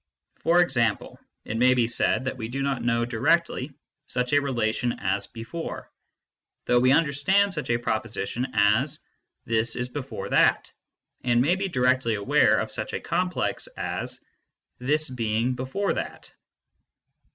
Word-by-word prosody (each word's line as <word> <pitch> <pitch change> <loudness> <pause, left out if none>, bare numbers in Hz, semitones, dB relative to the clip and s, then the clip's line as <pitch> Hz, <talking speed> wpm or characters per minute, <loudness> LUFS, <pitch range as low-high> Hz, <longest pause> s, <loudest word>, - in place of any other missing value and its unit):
For 175 +1 +4
example, 120 -10 0 0.3
it 110 - -3
may 130 +2 +5
be 120 -2 +2
said 120 +2 +1
that 130 - -2
we 110 -3 -5
do 135 +4 -3
not 135 -3 -1
know 120 0 +1
directly 135 +4 +1 0.4
such 125 +1 -2
a 145 - +5
relation 120 -3 0
as 100 +1 -2
before, 125 +8 -7 0.7
though 125 - +4
we 130 +1 +4
understand 165 +7 +3
such 150 -7 -4
a 120 - +3
proposition 115 +1 -2
as 110 +8 +2 0.2
" - - -54
this 115 0 0
is 125 0 -3
before 135 +1 -6
that/ - - +3 0.5
and 120 -1 +3
may 150 +9 +3
be 195 +1 -2
directly 125 - +2
aware 100 -1 +3
of - - -2
such - - -5
a - - -1
complex 180 - -1
as - - -4 0.3
" - - -55
this 155 +1 +2
being 115 -1 -1
before 130 +11 -2
that." - - -6
125 Hz, 150 wpm, -25 LUFS, 115-145 Hz, 0.7 s, may